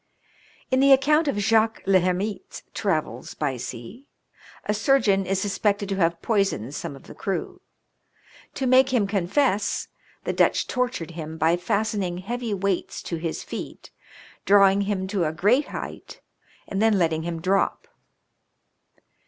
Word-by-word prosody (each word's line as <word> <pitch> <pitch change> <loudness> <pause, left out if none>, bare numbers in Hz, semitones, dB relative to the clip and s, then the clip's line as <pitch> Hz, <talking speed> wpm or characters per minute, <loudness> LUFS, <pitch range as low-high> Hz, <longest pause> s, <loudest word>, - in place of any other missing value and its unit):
In 260 - +3
the 275 +1 +5
account 300 +4 +3
of 280 - 0
Jaques 220 +2 +2
le 190 -1 +5
Hermite's 185 +3 -3
travels 190 -7 -2
by 145 -3 -1
sea, 125 - -8 0.6
^ 210 - +2
surgeon 210 -6 +2
is 195 0 0
suspected 200 0 0
to 195 - -1
have 170 -2 +1
poisoned 195 - 0
some 145 - -5
of 135 - -14
the - - -12
crew. 195 - -4 0.9
To 265 - -2
make 260 +1 +5
him 240 -5 +2
confess, 200 +3 0 0.3
the - - -2
Dutch - - +2
tortured 250 -10 -2
him 160 -1 -7
by 160 +2 +3
fastening 190 0 -1
heavy 235 +5 -4
weights 195 -2 -2
to 170 - -4
his 165 0 -4
feet, - - -8 0.5
drawing 200 0 +5
him 190 -2 -1
to 190 -3 -1
a 155 - 0
great 210 - +2
height - - -8 0.5
and 195 0 -2
then 220 -2 +4
letting 160 -3 +1
him 165 0 -4
drop. 195 - 0
195 Hz, 145 wpm, -24 LUFS, 175-225 Hz, 0.9 s, the